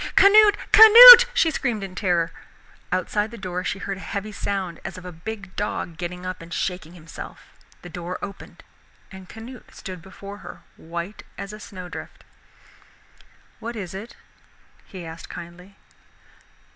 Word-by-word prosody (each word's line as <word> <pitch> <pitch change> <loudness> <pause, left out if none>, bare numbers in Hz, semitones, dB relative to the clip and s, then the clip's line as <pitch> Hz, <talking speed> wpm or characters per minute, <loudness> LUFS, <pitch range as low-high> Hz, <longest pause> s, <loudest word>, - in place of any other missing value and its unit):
"Canute, 415 +1 +6
Canute!" 485 +2 +11
she 325 -8 +1
screamed 240 -9 -3
in 190 -1 -8
terror. 175 -3 -1 0.6
Outside 205 +4 -2
the 235 - -11
door 180 -3 -5
she 160 +3 -3
heard 195 -1 -6
a - - -11
heavy 200 +2 -6
sound 195 -4 -5
as - - -8
of 185 - -12
a 180 - -8
big 195 +3 -9
dog 195 -4 -4
getting 180 +2 -7
up 185 -1 -6
and 165 +1 -13
shaking 175 -1 -4
himself. 165 -2 -12 0.3
The 175 - -10
door 175 +1 -7
opened 200 -1 -11 0.5
and 190 -2 -13
Canute 235 +3 -13
stood 185 -2 -9
before 200 +2 -12
her, - - -12
white 170 +5 -8 0.2
as 200 +1 -8
a 210 - -10
snow 185 -3 -10
drift. 180 - -11 1.4
"What 235 +1 -7
is 190 -5 -7
it?" 200 +5 -10 0.7
he 185 -3 -10
asked 165 +1 -11
kindly. 180 +3 -12
190 Hz, 155 wpm, -22 LUFS, 175-215 Hz, 1.4 s, Canute